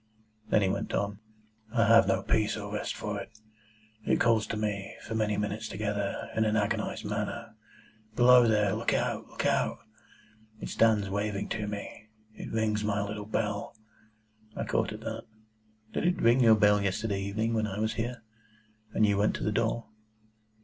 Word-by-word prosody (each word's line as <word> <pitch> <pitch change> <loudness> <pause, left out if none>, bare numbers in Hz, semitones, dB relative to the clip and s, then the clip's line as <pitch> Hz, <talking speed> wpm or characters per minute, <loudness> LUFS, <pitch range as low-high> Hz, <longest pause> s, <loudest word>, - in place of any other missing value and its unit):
Then 105 - +4
he - - +2
went 95 - -2
on. 100 0 -1 0.5
"I 115 -3 +3
have 115 -2 +7
no 95 -1 +1
peace 110 0 +1
or 105 -1 -6
rest 105 - -3
for 105 -1 -4
it. 115 - -12 0.7
It - - +2
calls 115 -2 +3
to 110 - -3
me, 105 -2 -3
for 110 - -6
many 110 -2 0
minutes 105 +2 -2
together, 105 0 -3
in 110 - +3
an 110 0 +1
agonised 105 -1 -1
manner, - - -4 0.6
'Below 125 0 +7
there! 105 -3 +2
Look 110 +2 0
out! - - -1
Look - - -5
out!' 70 +2 +1 0.8
It - - -6
stands 110 -3 +3
waving 100 +1 -2
to 105 -1 -2
me. 105 +1 -7 0.2
It - - -8
rings 110 -1 0
my 100 -1 0
little 105 0 -6
bell—" 105 -1 -2 0.8
I - - -2
caught - - 0
at - - -7
that. - - -5 0.7
"Did - - -1
it 180 +1 +1
ring 120 +3 +5
your 115 -3 +7
bell 105 -1 +4
yesterday 100 +1 -1
evening 110 +4 -1
when 110 -1 +1
I 95 -1 -5
was 110 +1 0
here, 120 +1 -4 0.7
and 110 - +4
you 100 -1 +2
went 105 - +2
to - - -4
the 105 - 0
door?" 115 +1 0
105 Hz, 175 wpm, -29 LUFS, 100-110 Hz, 0.8 s, have